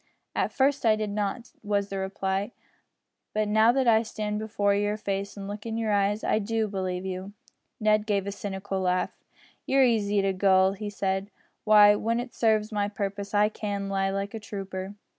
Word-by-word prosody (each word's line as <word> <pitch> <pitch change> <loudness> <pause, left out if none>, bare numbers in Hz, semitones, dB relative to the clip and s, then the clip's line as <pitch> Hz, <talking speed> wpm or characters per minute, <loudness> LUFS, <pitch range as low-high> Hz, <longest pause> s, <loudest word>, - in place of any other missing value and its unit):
"At - - 0
first 275 +1 +1
I 220 -2 +5
did 215 -1 -3
not," 210 +4 -3
was 205 -1 -1
the 195 - -3
reply, 190 +2 -2 0.8
"but 215 0 +1
now 220 +2 +5
that 265 0 +1
I 220 -1 +6
stand 210 -2 -3
before 205 -2 0
your 205 +1 0
face 200 -1 -3
and 195 -1 -6
look 205 +1 -6
in 225 -1 -4
your 225 -2 0
eyes 205 +1 +1
I - - +2
do 220 +1 -1
believe 185 -2 -3
you." 190 +1 -5 0.5
Ned 215 0 +2
gave 200 -2 +1
a 200 - -3
cynical 195 -1 -4
laugh. 180 0 0 0.5
"You're 270 0 +4
easy 210 -4 +2
to 195 0 +1
gull," 190 0 +4
he 205 +1 -5
said; 195 -1 -2 0.4
"why, 210 -1 +8
when 230 +3 0
it 245 0 -6
serves 220 -1 +1
my 205 -1 0
purpose 200 0 -4
I 205 +1 +5
can 200 -2 -4
lie 195 0 0
like 195 +1 -3
a 225 - -4
trooper." 195 -1 -6
205 Hz, 190 wpm, -27 LUFS, 195-215 Hz, 0.8 s, why